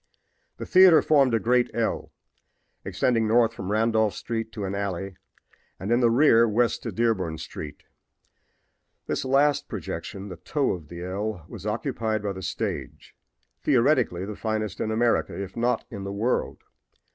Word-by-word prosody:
The - - -6
theater 185 -4 +7
formed 135 -6 +4
a - - +2
great 125 +2 +2
L, 115 -1 -1 0.7
extending 115 -3 +1
north 115 +1 +3
from 100 -3 -5
Randolph 110 -1 +2
street 115 -1 -4
to 105 - -4
an 95 - -3
alley 100 -1 -3 0.6
and, 95 +5 -4
in 120 - +4
the 120 -2 +4
rear, 115 -2 +5
west 115 +3 +1
to 115 - -4
Dearborn 95 -7 0
street. 75 -1 -8 1.2
This - - -2
last 140 +2 +2
projection, 100 +1 -6
the 90 - -8
toe 135 - -1
of 85 -4 -6
the 85 +2 -8
L, 95 -1 -4
was - - -8
occupied 110 -2 -2
by 100 -1 -2
the 95 - -8
stage, - - -5 0.5
theoretically 125 - +2
the 105 +1 -6
finest 110 -3 -3
in 110 - -1
America, 115 -1 +1
if 95 -1 -6
not 120 +1 0
in 100 -4 -6
the 100 - -4
world. 110 +5 -1
110 Hz, 155 wpm, -25 LUFS, 100-120 Hz, 1.2 s, theater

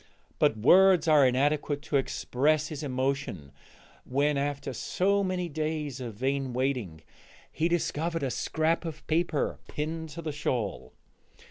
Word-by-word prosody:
But 110 - +3
words 180 - +6
are 150 -4 +6
inadequate 145 +3 0
to 145 - +1
express 150 +3 0
his 155 -2 -6
emotion 130 - -2 0.5
when, 145 +3 +1
after 140 -1 -2
so 200 - +1
many 185 -2 -1
days 155 -3 -3
of 115 -4 -6
vain 135 +2 -1
waiting, 125 - -2 0.5
he 165 - 0
discovered 165 -1 -1
a 135 - -1
scrap 160 +6 0
of 160 -2 -7
paper 160 -2 0
pinned 160 +2 -4
to 170 +3 -8
the 155 - -2
shawl. 125 -8 -3
145 Hz, 135 wpm, -28 LUFS, 135-160 Hz, 0.5 s, words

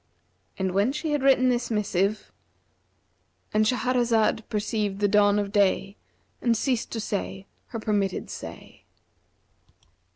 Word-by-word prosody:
And 190 -1 -1
when 200 +7 +2
she 300 +2 -3
had 295 -2 +1
written 260 -1 +4
the 245 -1 0
missive,—And 210 +1 -4
Shahrazad 235 -2 +2
perceived 210 -1 -2
the 205 - +3
dawn 205 0 +4
of 200 -1 -1
day 200 -1 +2 0.5
and 235 -2 +2
ceased 250 -1 -1
to 230 - -2
say 195 -2 -4 0.2
her 230 - -5
permitted 205 -3 -1
say. - - -10
215 Hz, 120 wpm, -26 LUFS, 200-240 Hz, 0.5 s, written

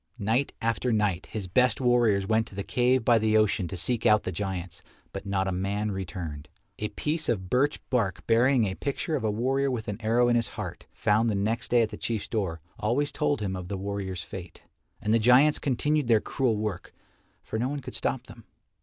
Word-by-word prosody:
Night 115 +6 0
after 115 +2 0
night 105 -5 0
his 105 -3 -5
best 125 +7 +3
warriors 120 -6 +3
went 110 +2 +1
to - - -12
the 100 - -3
cave 125 +1 +2
by 120 -2 +5
the 110 0 +3
ocean 105 -3 +2
to 90 - -6
seek 120 +6 0
out 105 -2 +4
the - - -3
giants, 95 -4 -4 0.3
but 100 0 -6
not 95 -1 0
a - - 0
man 100 +3 -1
returned. 85 -6 -6 0.3
A 105 - -1
piece 155 +7 -2
of 95 -6 -2
birch 140 +4 +2
bark 115 -7 0
bearing 120 +1 +4
a 95 - -2
picture 140 +7 -2
of 135 - -2
a 110 - +1
warrior 135 +6 +1
with 120 -4 -3
an 105 +1 -4
arrow 115 +2 +3
in 120 - +3
his 115 -1 +2
heart, - - -6
found 110 +2 +2
the 105 - 0
next 110 +5 -1
day 120 -1 +4
at 110 - -1
the 105 - -8
Chief's 110 -3 -3
door, 95 -8 -2 0.2
always 135 +7 0
told 145 -5 0
him 95 -2 -2
of 90 -1 -6
the 100 0 -3
warrior's 95 -2 -4
fate. 90 -2 -9 0.4
And 105 - +1
the 115 - +4
giants 125 +6 +5
continued 145 +1 0
their 115 -2 +5
cruel 120 -1 0
work, 105 -4 -4 0.5
for 110 - -4
no 125 +3 0
one 145 0 -3
could - - -8
stop - - -2
them. - - -14
110 Hz, 215 wpm, -27 LUFS, 100-125 Hz, 0.5 s, by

